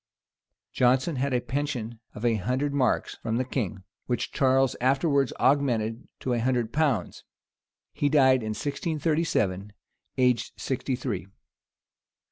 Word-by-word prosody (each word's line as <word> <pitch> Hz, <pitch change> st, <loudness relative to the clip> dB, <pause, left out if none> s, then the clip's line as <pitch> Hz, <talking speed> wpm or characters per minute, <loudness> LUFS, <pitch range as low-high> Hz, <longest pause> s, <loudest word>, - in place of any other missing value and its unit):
Jonson 130 Hz, +5 st, +2 dB
had 140 Hz, +2 st, 0 dB
a 125 Hz, -, +2 dB
pension 125 Hz, -4 st, -3 dB, 0.2 s
of 110 Hz, -, -5 dB
a 120 Hz, -, +4 dB
hundred 125 Hz, +8 st, -1 dB
marks 130 Hz, -5 st, 0 dB
from 115 Hz, 0 st, -2 dB
the 130 Hz, -, 0 dB
king, 110 Hz, -7 st, -3 dB, 0.2 s
which 125 Hz, -, -1 dB
Charles 135 Hz, -1 st, +3 dB
afterwards 140 Hz, +1 st, +2 dB
augmented 120 Hz, -5 st, +1 dB
to 125 Hz, -, -1 dB
a 120 Hz, -, +1 dB
hundred 120 Hz, -2 st, 0 dB
pounds 140 Hz, -, 0 dB, 0.7 s
He 145 Hz, -, +1 dB
died 130 Hz, -3 st, +5 dB
in 110 Hz, -1 st, -3 dB
1637, 145 Hz, -, -1 dB, 0.4 s
aged 125 Hz, -2 st, +2 dB
sixty 130 Hz, 0 st, -2 dB
three. 115 Hz, -7 st, -4 dB
130 Hz, 125 wpm, -27 LUFS, 115-140 Hz, 0.7 s, died